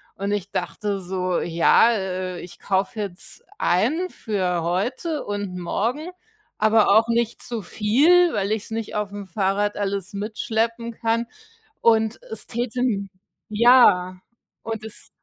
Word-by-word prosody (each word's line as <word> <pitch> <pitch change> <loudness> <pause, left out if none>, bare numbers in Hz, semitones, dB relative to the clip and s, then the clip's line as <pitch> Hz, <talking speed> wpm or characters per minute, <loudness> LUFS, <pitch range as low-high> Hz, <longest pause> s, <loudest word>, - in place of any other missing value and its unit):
und 200 +1 -3
ich 205 -2 -2
dachte 200 +1 -3
so: 185 -1 -2
„Ja, 170 +7 +4
äh, 185 -4 -3
ich 175 - -11
kaufe 195 +2 -1
jetzt 195 -3 -7 0.2
ein 290 - +1
für 185 - -2
heute 240 - -2
und 205 -3 -4
morgen, 240 - -2 0.5
aber 215 0 +4
auch 220 +3 +5
nicht 235 0 0
zu 235 -2 -4
viel, 285 - +3
weil 200 -1 -1
ich's 220 0 -3
nicht 225 -1 -4
auf'm 205 -1 -4
Fahrrad 200 +2 0
alles 200 -2 -3
mitschleppen 225 +3 -2
kann.“ 230 +1 -1 0.5
Und 225 -1 +3
es 220 - -5
täte 245 +1 -3
n 205 -6 0 0.4
Ja, 210 -5 +5 0.5
und 225 -1 -4
es 220 - -11
210 Hz, 135 wpm, -23 LUFS, 190-230 Hz, 0.5 s, auch